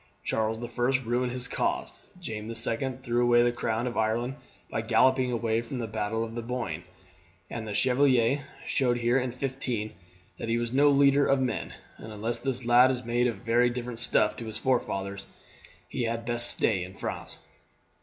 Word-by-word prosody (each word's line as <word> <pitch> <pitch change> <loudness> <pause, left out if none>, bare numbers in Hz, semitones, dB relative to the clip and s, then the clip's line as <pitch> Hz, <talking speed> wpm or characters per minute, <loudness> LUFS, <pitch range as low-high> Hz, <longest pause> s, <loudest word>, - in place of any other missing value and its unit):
Charles 110 0 0
the 120 - -5
First 125 +2 0
ruined 125 +2 0
his 125 0 -4
cause; - - -2 0.2
James 110 -10 -5
the 115 - -5
Second 125 +3 -1
threw 120 0 +1
away 120 0 +5
the 120 - +3
crown 115 0 -2
of 125 - -3
Ireland 115 +4 0 0.3
by 110 - -2
galloping 125 +3 +3
away 115 -1 0
from 120 +3 -6
the 120 - -2
battle 110 +1 -2
of 115 0 -6
the 120 - -4
Boyne; 125 +1 -4 0.7
the 110 -2 -4
Chevalier 130 +1 +3 0.2
showed 125 -3 +2
here 120 +2 +2
in 125 -1 -2
'15 125 -4 -3 0.5
that 115 - -4
he 115 - +2
was 120 0 -2
no 145 +2 +5
leader 140 0 +5
of 135 - +3
men; 130 -1 -2 0.2
and 110 - -9
unless 110 +3 -3
this 130 -1 -3
lad 120 +2 +6
is 125 -2 -2
made 120 +1 +2
of 120 0 -4
very 120 +2 +4
different 120 -1 -4
stuff 110 -3 +3
to 115 - -6
his 110 0 -5
forefathers 100 -6 -1 0.6
he 120 - -2
had 115 0 -2
best 120 0 +1
stay 95 -5 +1
in 95 +1 -9
France." - - -5
120 Hz, 185 wpm, -28 LUFS, 115-125 Hz, 0.7 s, lad